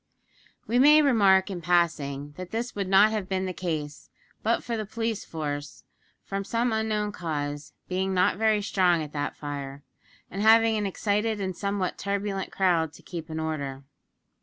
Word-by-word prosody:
We 240 +2 +1
may 300 +3 +7
remark 200 -8 +4
in 180 -2 -5
passing, 150 -5 0
that 185 -1 -7
this 230 +4 -3
would 200 -2 -3
not 195 +3 +6
have 210 -4 -3
been 190 -1 -1
the 185 - -3
case, 155 -5 -4 0.3
but 230 +2 +1
for 235 - -3
the 220 - -2
police 225 -1 -2
force, 145 -2 -5 0.4
from 195 0 -3
some 230 +3 0
unknown 215 -1 0
cause, 145 -4 -4
being 190 +1 -1
not 185 0 +2
very 215 -1 +2
strong 180 -5 +2
at 150 - -9
that 145 -1 -3
fire, 140 -1 -6 0.5
and 195 - -4
having 225 +1 +6
an 210 -2 0
excited 210 +2 -1
and 190 -2 -3
somewhat 200 -1 -2
turbulent 200 -1 -2
crowd 170 -5 +1
to - - -15
keep 170 -3 -7
in 160 0 -4
order. 140 -4 -4
190 Hz, 170 wpm, -27 LUFS, 160-215 Hz, 0.5 s, may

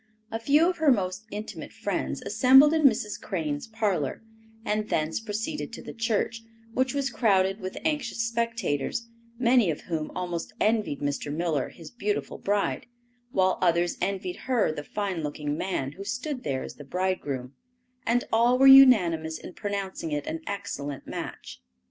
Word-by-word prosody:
A 225 - -2
few 290 +8 +4
of 360 - 0
her 310 -3 +4
most 195 -1 -1
intimate 210 +1 -7
friends - - -3
assembled 270 +4 +6
in 315 -2 +2
Mrs. 215 -2 -4
Crane's 155 -5 -3
parlor, 205 - -1 0.4
and 215 0 -1
thence 155 +1 0
proceeded 225 +8 -4
to - - -8
the - - -8
church, 225 0 -1 0.3
which 260 +2 0
was 275 -2 0
crowded 195 -3 +2
with 185 -1 -6
anxious 295 -7 -1
spectators, 230 - -1 0.3
many 240 -4 +4
of 155 - -2
whom 160 -3 -3
almost 175 -2 -4
envied 215 -9 +1
Mr. 145 0 -2
Miller 155 -3 -1
his 165 -3 -12
beautiful 210 -4 -3
bride, 205 +2 -1 0.4
while 185 -3 +2
others 175 -1 +2
envied 185 -1 -2
her 245 -10 +3
the 145 -1 -6
fine 195 -1 -3
looking 150 0 -3
man 150 -6 -2
who 190 +7 -9
stood 250 +5 -4
there 135 -2 -2
as - - -9
the 145 - -9
bridegroom, 145 -6 -2 0.5
and 245 +1 +2
all 240 +2 +4
were 270 - +5
unanimous 180 -13 +7
in 180 - -10
pronouncing 200 -5 -4
it 145 -1 -2
an 160 - -4
excellent 145 -8 -5
match. - - -7
200 Hz, 160 wpm, -27 LUFS, 165-235 Hz, 0.5 s, unanimous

